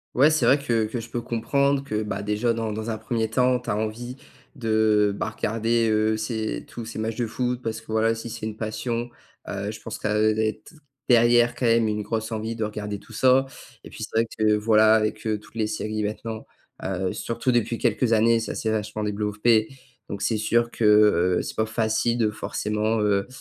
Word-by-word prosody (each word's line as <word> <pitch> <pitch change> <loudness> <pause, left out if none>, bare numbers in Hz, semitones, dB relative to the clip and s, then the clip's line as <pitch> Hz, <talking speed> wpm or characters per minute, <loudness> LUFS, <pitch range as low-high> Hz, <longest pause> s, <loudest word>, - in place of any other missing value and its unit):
Ouais, 145 +5 +6
c'est 155 - +2
vrai 140 - +6
que 115 -6 0
que 115 +2 -4
je 115 - -8
peux 120 - -2
comprendre 140 +4 0
que, 110 -5 -2
bah, 105 -1 -4
déjà 105 +3 0
dans 115 -1 -2
dans 110 +2 -4
un 110 - -2
1er 115 -1 -2
temps, 125 +1 +2
tu 125 - -8
as - - +1
envie 120 +4 -4 0.4
de, 110 -4 +2
bah, 110 - -2
regarder, 115 +1 0
heu, 110 0 +2
ces 110 0 -3
tous 120 - -8
ces 115 - -8
matchs 110 +1 -3
de 120 -2 -1
foot 125 +2 -2
parce 115 -1 -3
que 110 -1 -12
voilà, 110 +1 +2
si 115 +1 -7
c'est 115 -1 -5
une 110 0 -6
passion, 115 +2 -3 0.4
heu, 100 +1 -3
je 110 - -9
pense 115 - -7
qu'elle 110 0 +2
doit 110 - +1
être 110 +7 -4 0.4
derrière 120 0 +5
quand 120 - -1
même 115 -1 +4
une 105 0 -1
grosse 110 +2 -3
envie 110 +1 -3
de 115 - -2
regarder 105 -1 -4
tout - - -16
ça 130 +1 +4 0.4
et - - -10
puis - - -7
c'est - - -5
vrai 115 +1 +3
que, 110 -1 +4
voilà, 110 0 +5
avec, 110 0 -1
heu, 110 -1 +1
toutes 105 - -19
les 110 -2 -1
séries 110 0 -3
maintenant, 110 +1 -5 0.4
heu, 95 -1 -2
surtout 120 +2 -2
depuis 120 -1 +1
quelques 120 +1 +1
années. 115 +1 +4
Ça 115 - -4
s'est 110 - -1
vachement 105 0 -2
développé 105 +2 +1 0.4
donc 100 -1 -4
c'est 110 +1 +1
sûr 115 +2 +1
que, - - -4 0.6
heu, - - 0
c'est - - -6
pas 110 - 0
facile 110 +1 0
de 110 -3 +1
forcément, 105 +1 -1
heu, 100 -2 +1
110 Hz, 215 wpm, -24 LUFS, 110-115 Hz, 0.6 s, Ouais